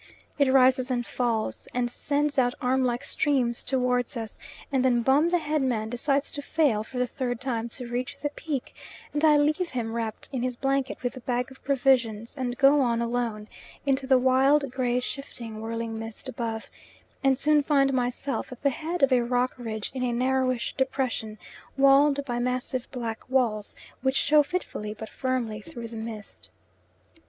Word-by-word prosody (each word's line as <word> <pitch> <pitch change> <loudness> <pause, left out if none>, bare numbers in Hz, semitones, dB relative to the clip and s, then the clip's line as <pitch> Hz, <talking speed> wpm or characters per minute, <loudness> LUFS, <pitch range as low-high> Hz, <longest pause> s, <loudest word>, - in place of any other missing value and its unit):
It 280 -2 +4
rises 260 -1 +5
and 245 -2 0
falls, 230 -3 -2
and 250 -1 +1
sends 290 +3 0
out 245 -1 +2
arm 260 +1 +1
like 245 -1 0
streams 250 -5 +1
towards 250 -1 0
us, 225 -2 -6 0.3
and 265 -2 +2
then 240 -2 +3
Bum, 280 +7 +4
the 355 - +3
head 305 -2 -1
man, 225 -5 0
decides 275 +4 0
to 290 - -3
fail 285 -7 +2
for 250 - -9
the 250 - +2
third 245 -1 -3
time 235 -3 -2
to 250 +2 -5
reach 245 +1 -3
the 290 - -2
peak, 290 -4 -4 0.4
and 295 +1 -1
I 305 -2 +6
leave 305 +4 +1
him 230 -3 -3
wrapped 225 -2 -3
in 255 - -1
his 250 0 -1
blanket 270 0 -1
with 245 - -1
the 260 - -8
bag 250 +1 -2
of 265 - -15
provisions, 245 -5 +1
and 250 -3 -3
go 280 +2 +6
on 235 -3 +1
alone 235 -3 -2 0.4
into 270 -1 +1
the 260 -1 +6
wild, 265 +2 +3
grey, 250 -1 0
shifting, 235 -5 -6
whirling 225 0 -4
mist 225 +3 -6
above, 230 -3 -4 0.5
and 270 -1 +4
soon 300 +2 +4
find 275 -2 +3
myself 250 +2 -2
at 255 - -10
the 280 - +4
head 320 +3 -3
of 275 - +5
a 250 -1 +5
rock 245 +1 +1
ridge 220 -4 -4
in 260 - -4
a 250 -1 +1
narrowish 255 0 0
depression, 255 -5 -1 0.4
walled 275 +1 +5
by 240 -3 -2
massive 250 0 -2
black 230 -2 -5
walls 230 -6 0 0.3
which 265 +1 +1
show 300 +2 +5
fitfully 280 -10 -4
but 220 +1 -8
firmly 245 -5 -2
through 230 +3 -8
the 230 - -10
mist. 220 -2 -7
255 Hz, 180 wpm, -27 LUFS, 235-275 Hz, 0.5 s, I